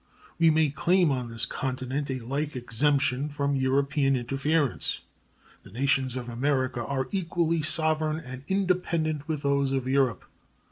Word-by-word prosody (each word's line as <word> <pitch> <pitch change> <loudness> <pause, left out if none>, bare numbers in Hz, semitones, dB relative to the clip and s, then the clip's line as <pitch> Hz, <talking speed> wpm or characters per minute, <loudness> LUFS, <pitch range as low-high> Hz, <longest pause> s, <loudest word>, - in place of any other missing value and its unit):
We 165 -1 +6
may 155 -2 +3
claim 175 +3 +2
on 125 -3 -2
this 115 -1 -1
continent 130 +2 -3
a 130 - -1
like 140 +5 -3
exemption 135 +3 +1
from 140 -1 -1
European 135 +1 +1
interference. 135 +3 0 0.6
The 100 - -15
nations 130 +1 +1
of 125 -2 -5
America 130 0 -1
are 130 +1 -2
equally 170 -3 0
sovereign 155 0 +1
and 130 -3 -9
independent 170 -5 0
with 155 -3 -3
those 140 -1 +1
of 135 -2 -1
Europe. 130 -5 +1
140 Hz, 140 wpm, -27 LUFS, 130-155 Hz, 0.6 s, We